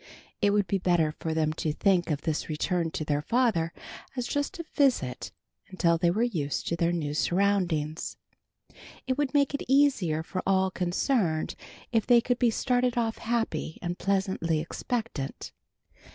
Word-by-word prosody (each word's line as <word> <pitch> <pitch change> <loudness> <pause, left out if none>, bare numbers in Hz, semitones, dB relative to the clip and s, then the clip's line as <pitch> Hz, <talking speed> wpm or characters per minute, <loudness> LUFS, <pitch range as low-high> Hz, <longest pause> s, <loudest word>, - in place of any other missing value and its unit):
It 205 - +4
would 205 0 +2
be 195 +2 0
better 175 -4 +2
for 160 +1 -4
them 155 -1 +1
to 155 - 0
think 180 +1 +2
of 150 -2 -1
this 155 0 -2
return 165 +2 0
to 155 - -4
their 145 -1 0
father 220 -5 +1 0.4
as 250 -2 -2
just 285 +9 -2
a 335 - -6
visit 255 - +1 0.4
until 170 -3 +1
they 170 0 +3
were 210 +7 +1
used 160 - -2
to 170 - 0
their 170 0 +1
new 155 -4 -2
surroundings. 175 -3 0 0.9
It 260 - 0
would 290 -1 0
make 280 -1 +3
it 280 - -2
easier 250 - +3
for 185 +2 -4
all 190 -1 +2
concerned 180 - 0 0.4
if 225 -3 +1
they 240 -1 +7
could 245 +1 -1
be 245 - +4
started 245 +1 +1
off 225 -2 0
happy 225 -8 -2
and 175 -1 -3
pleasantly 190 -4 0
expectant. 170 - -4
185 Hz, 165 wpm, -28 LUFS, 160-235 Hz, 0.9 s, they